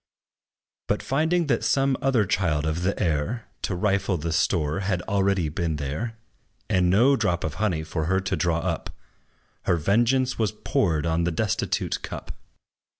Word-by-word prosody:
But, - - 0
finding 160 +5 +1
that 125 -6 0
some 135 -1 +2
other 130 -6 +3
child 90 -6 0
of 80 +2 -1
the 95 +3 -1
air, 85 +9 -1 0.2
To 95 - -2
rifle 100 0 +1
the 80 +1 -3
store, 80 -1 +1
had 95 -3 -1
already 100 -4 +1
been 80 +1 -2
there, 75 - -4 0.5
And 90 -1 +2
no 120 +9 +5
drop 100 -8 0
of 80 - -2
honey 90 -8 +1
for 80 0 -3
her 95 +3 +2
to 95 - -1
draw 85 -1 0
up, - - -2 0.8
Her - - +3
vengeance 120 - +2
was 110 -1 +1
poured 85 -6 0
on 85 +1 +1
the 85 - +1
destitute 100 +5 -1
cup. - - -7
95 Hz, 160 wpm, -25 LUFS, 80-110 Hz, 0.8 s, no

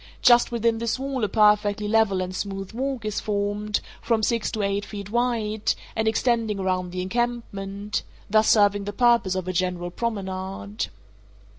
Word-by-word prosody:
Just 240 -1 +6
within 230 -1 +1
this 230 +1 -1
wall 270 -2 -3
a 210 - +1
perfectly 210 0 +3
level 210 -3 +3
and 185 0 -5
smooth 195 -1 -4
walk 260 -1 -3
is 215 -1 -1
formed, 205 0 -1 0.2
from 225 -2 +1
six 230 0 +1
to 215 - -1
eight 200 +1 0
feet 205 -1 -7
wide, 225 -3 0 0.2
and 220 0 0
extending 225 -1 +1
around 185 -2 -1
the 180 0 -3
encampment—thus 210 -1 -1
serving 205 -2 +4
the 205 - -4
purpose 235 -4 +3
of 185 -1 -3
a 185 - -1
general 175 -1 -1
promenade. 200 0 -3
210 Hz, 155 wpm, -25 LUFS, 195-230 Hz, 0.2 s, Just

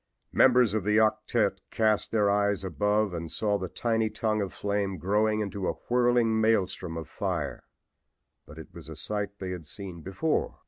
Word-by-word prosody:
Members 125 -4 +5
of 110 -3 0
the 105 +2 +2
octette 110 -2 +1
cast 110 -2 +1
their 105 -2 +3
eyes 100 -1 +1
above 105 +3 0
and 85 -2 -5
saw 105 -2 0
the 95 - -4
tiny 115 +2 0
tongue 110 -1 -1
of 95 -2 -3
flame 100 -2 -2
growing 105 +3 +1
into 100 -2 -3
a - - +1 0.2
whirling 120 -2 +3
maelstrom 95 -6 +1
of 80 - -6
fire. - - -3 0.8
But 75 - -12
it 80 - -11
was - - -10
a - - -7
sight 105 -1 -4
they 95 -2 -5
had 85 -4 -7
seen 85 +3 -7
before. 95 - -1
105 Hz, 175 wpm, -28 LUFS, 95-110 Hz, 0.8 s, Members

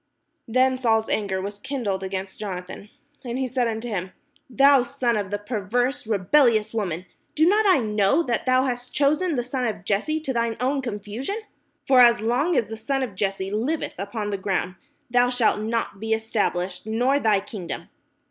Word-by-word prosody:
Then 255 +2 +2
Saul's 225 -3 +2
anger 195 -3 -1
was 200 +2 -6
kindled 210 -7 -3
against 190 0 -5
Jonathan, 190 0 -6 0.3
and 245 -1 -4
he 260 -1 -1
said 250 -1 0
unto 225 +1 -3
him: 190 -4 -4 0.4
"Thou 275 +1 +5
son 245 -1 -1
of 205 -2 -2
the 205 - -1
perverse 235 +5 -1
rebelHous 220 +2 +3
woman, 185 -6 -2 0.3
do 315 +2 +4
not 420 +3 +4
I 375 - +6
know 215 +5 +2
that 245 -3 -2
thou 255 0 +4
hast 245 -1 -4
chosen 300 +5 +2
the 245 - 0
son 250 0 -2
of 210 -4 -5
Jesse 215 +11 0
to 275 -4 -3
thine 230 -1 -1
own 270 +3 0
confusion? 230 - -4 0.5
For 265 -1 +5
as 240 -2 +7
long 250 +10 +1
as 230 - +2
the 225 +1 -7
son 270 +5 -1
of 240 -6 -4
Jesse 195 0 -2
hveth 250 +10 -1
upon 205 +1 -3
the 200 - -2
ground, 190 -2 -1 0.4
thou 245 0 +4
shalt 245 -4 +2
not 220 -2 -2
be 220 +1 -1
estab 220 -1 0
lished, 180 +2 -5
nor 250 +6 +2
thy 215 -6 +3
kingdom. 195 -3 -7
230 Hz, 185 wpm, -24 LUFS, 205-255 Hz, 0.5 s, as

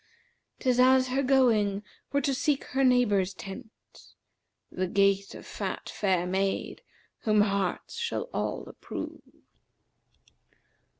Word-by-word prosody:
'Tis 250 -2 +1
as 255 0 +5
her 265 +2 +1
going 225 -7 +3 0.3
were 280 - +1
to 275 +1 0
seek 285 +1 0
her 270 +1 -1
neighbour's 210 -7 +3
tent, 215 +5 -12
* - - -52 0.3
The 185 0 -2
gait 200 +1 +2
of - - -10
fat - - -5
fair 185 -4 0
maid, 195 +2 -1 0.4
whom 215 -2 +3
hearts 200 - -1
shall 470 0 -2
all - - -3
approve.' - - -7
215 Hz, 120 wpm, -28 LUFS, 195-260 Hz, 0.4 s, as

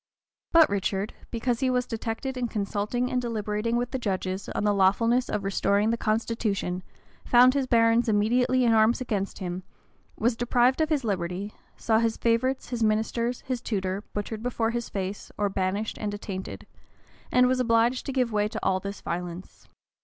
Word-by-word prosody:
But 330 -1 +7
Richard, 200 +1 -1 0.2
because 235 0 -1
he 260 -1 +1
was 250 -1 +1
detected 230 +3 -4
in 250 -1 -1
consulting 215 +3 -2
and 250 - +1
deliberating 220 -1 -2
with 245 0 -1
the 265 - -2
judges 190 -3 -3
on - - -2
the 210 -1 +3
lawfulness 230 +6 +3
of 210 -2 -2
restoring 200 +2 +1
the - - +1
constitution, 215 -5 -1 0.4
found 250 +1 +6
his 275 -2 0
barons 230 0 +3
immediately 245 +4 +2
in 230 - +4
arms 220 +1 +4
against 205 -6 -2
him; 180 -1 -4 0.6
was 235 +1 +1
deprived 245 +4 +2
of 315 - +1
his 295 -4 +1
liberty; 190 -1 -3 0.2
saw 220 -1 +2
his 230 -1 0
favorites, 250 +3 0
his 240 -2 -3
ministers, 225 +3 0
his 255 -2 -3
tutor, 195 -3 -2
butchered 210 +1 -4
before 230 -1 -1
his 235 0 -3
face, 195 0 -5
or 205 -1 +1
banished 195 +3 -2
and 205 -1 -3
attainted; 190 -2 -6 0.7
and 250 0 +5
was 255 0 +1
obliged 235 +1 +2
to - - -1
give 255 -3 0
way 210 -1 +1
to 220 0 -5
all 190 0 +2
this 200 +1 -6
violence. 175 +1 -6
225 Hz, 175 wpm, -26 LUFS, 200-245 Hz, 0.7 s, But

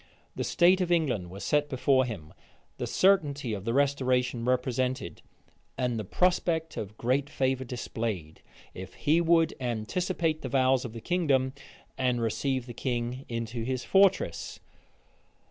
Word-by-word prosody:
The - - -2
state 180 +2 +4
of 175 -1 0
England 130 - +1
was 95 +3 -8
set 145 0 +1
before 130 0 +2
him, 95 -11 -7 0.4
the - - -3
certainty 145 - +2
of 100 -1 -5
the 115 - 0
restoration 130 -3 +1
represented, 125 - -1 0.6
and 125 -3 -1
the - - -3
prospect 165 - 0
of 105 +1 -6
great 130 +4 0
favor 130 -1 0
displayed, 110 -9 -4 0.3
if 95 +1 -9
he 155 +3 +2
would 165 -1 +3
anticipate 155 - -1
the 130 - -4
vows 130 0 +2
of 115 - -6
the 115 - -8
kingdom, 135 -7 +1 0.5
and 125 -2 +1
receive 130 +3 -1
the 120 - -8
king 125 +1 -3
into 115 0 -4
his 130 +1 -2
fortress. 195 - +2
130 Hz, 145 wpm, -28 LUFS, 115-150 Hz, 0.6 s, state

